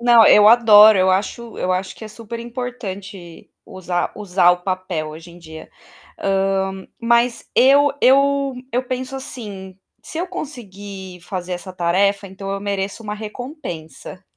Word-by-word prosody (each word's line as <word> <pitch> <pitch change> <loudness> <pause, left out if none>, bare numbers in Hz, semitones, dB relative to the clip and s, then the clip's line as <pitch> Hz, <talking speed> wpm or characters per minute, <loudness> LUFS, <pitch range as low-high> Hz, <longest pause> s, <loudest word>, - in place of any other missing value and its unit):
Não, 235 -2 +6
eu 210 0 +7
adoro, 215 -3 +7
eu 185 0 +3
acho 220 +5 -2
eu 185 - 0
acho 185 +1 -3
que - - -10
é - - -8
super 230 +1 -8
importante 210 -7 -8
usar 180 -1 -3
usar 185 -3 +3
o 180 0 -1
papel 185 -4 -3
hoje 160 +3 -11
em 175 - -14
dia. 160 -2 -12 0.5
Ah, 195 0 0 0.3
mas 235 +1 +1
eu 280 +3 +5
eu 275 +1 +3 0.2
eu 250 +2 0
penso, 255 +1 -4
assim: 200 -8 -8 0.3
"Se 320 - -7
eu 355 - -2
conseguir 200 - -8
fazer 180 -1 -5
essa 180 +1 -6
tarefa, 195 +3 +1
então 195 +1 -8
eu 195 0 -3
mereço 200 +1 -3
uma 210 -1 -5
recompensa". 215 - -8
200 Hz, 150 wpm, -20 LUFS, 185-235 Hz, 0.5 s, eu